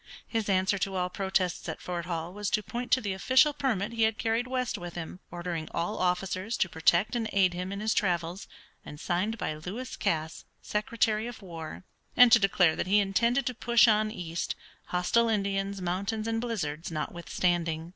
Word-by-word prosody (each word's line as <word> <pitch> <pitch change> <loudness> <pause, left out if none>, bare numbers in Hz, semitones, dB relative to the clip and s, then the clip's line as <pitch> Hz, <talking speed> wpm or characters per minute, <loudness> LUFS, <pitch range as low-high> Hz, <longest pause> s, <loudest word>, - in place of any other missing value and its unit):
His 225 -3 -2
answer 190 +1 +2
to 195 +1 -2
all 180 -1 -1
protests 190 -3 -1
at - - -5
Fort 175 -2 -4
Hall 170 0 -3
was 205 0 -2
to 210 - +1
point 245 +4 -5
to 260 - +4
the 200 -3 -2
official 260 +10 +4
permit 230 -7 -1
he 230 - -2
had 220 0 +3
carried 230 +2 0
west 255 -1 -1
with 175 -1 -7
him, 175 +1 -6
ordering 175 -2 -4
all 175 +6 -2
officers 185 +4 -1
to - - +2
protect 170 +6 +2
and 225 -2 -1
aid 190 -2 +3
him 180 +2 -4
in 200 +1 -4
his 220 +1 +1
travels, 175 -3 -1 0.4
and 150 - -10
signed 190 +8 -1
by 180 - -2
Lewis 190 +12 -6
Cass, 160 0 -2 0.2
Secretary 220 0 0
of 240 -3 -9
War, 165 -2 -8 0.3
and 245 -1 +8
to 235 - +8
declare 185 -5 +3
that - - -2
he 200 +2 +4
intended 235 +6 +2
to 255 - -1
push 235 0 +4
on 215 -1 +3
east, 170 -5 -4 0.3
hostile 225 +6 +2
Indians, 200 -2 -1
mountains, 200 +5 -2
and 225 0 0
blizzards 175 -10 -3
notwithstanding. 170 0 -1
195 Hz, 185 wpm, -29 LUFS, 175-225 Hz, 0.4 s, and